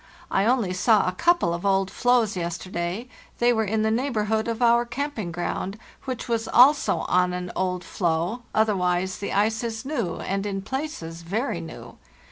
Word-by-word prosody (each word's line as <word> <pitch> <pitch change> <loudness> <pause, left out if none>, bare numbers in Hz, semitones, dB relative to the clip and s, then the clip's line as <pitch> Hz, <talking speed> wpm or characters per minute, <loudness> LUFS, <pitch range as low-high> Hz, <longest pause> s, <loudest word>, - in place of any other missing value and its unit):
I 195 - +2
only 230 -6 +2
saw 210 +2 +3
a - - +2
couple 340 - +2
of 170 - -4
old 195 -1 +2
floes 245 -4 +2
yes 170 -1 -2
terday—they 195 +7 -2
were 220 -1 +1
in 215 +1 0
the 220 - +2
neighborhood 220 -3 0
of 230 -1 -2
our 235 -1 +4
camping 240 -6 -4
ground, 180 +4 -3 0.3
which 255 -2 -4
was 230 -1 -1
also 280 +4 +5
on 180 0 +2
an 180 0 -4
old 180 -1 -1
floe; 175 +6 -1
otherwise 185 -4 +1
the 200 - -4
ice 215 +3 +1
is 225 +1 -4
new, 235 - -2
and 195 +1 -2
in 195 -1 -3
places 215 - -5
very 190 +2 -2
new. 165 - -10
210 Hz, 170 wpm, -25 LUFS, 180-235 Hz, 0.3 s, also